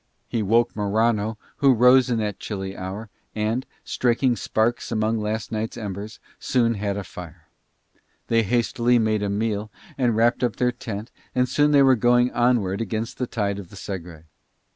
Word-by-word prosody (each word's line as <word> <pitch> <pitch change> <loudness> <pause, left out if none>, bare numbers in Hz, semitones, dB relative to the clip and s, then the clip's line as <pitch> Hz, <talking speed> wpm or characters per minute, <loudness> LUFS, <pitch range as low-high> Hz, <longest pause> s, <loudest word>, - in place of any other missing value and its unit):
He 115 - -1
woke 115 +4 +2
Morano 110 +1 +1 0.2
who 135 -2 +5
rose 125 +2 +6
in 120 - +1
that 105 -2 -2
chilly 95 -2 -5
hour 100 +3 -6 0.2
and, 110 +4 -1 0.2
striking 125 +1 +1
sparks 115 +2 -1
among 110 0 0
last 105 -1 -3
night's 110 +1 -3
embers, 105 0 -6 0.2
soon 120 -2 +1
had 100 -1 -2
a 100 - -3
fire: 90 -3 -11 0.8
they 115 0 +3
hastily 120 +2 +2
made 110 -2 +1
a 100 - -1
meal 105 0 -1 0.3
and 120 -3 +2
wrapped 120 +2 +2
up 120 -3 +1
their 125 0 +1
tent 115 -2 -7 0.2
and 125 0 +2
soon 145 +4 +3
they 145 -2 +6
were 135 -1 +6
going 120 +2 +3
onward 120 -5 +1
against 110 +1 -4
the 125 - -1
tide 100 -4 -2
of 95 -4 -10
the - - -13
Segre. 90 -5 -7
110 Hz, 170 wpm, -23 LUFS, 105-120 Hz, 0.8 s, rose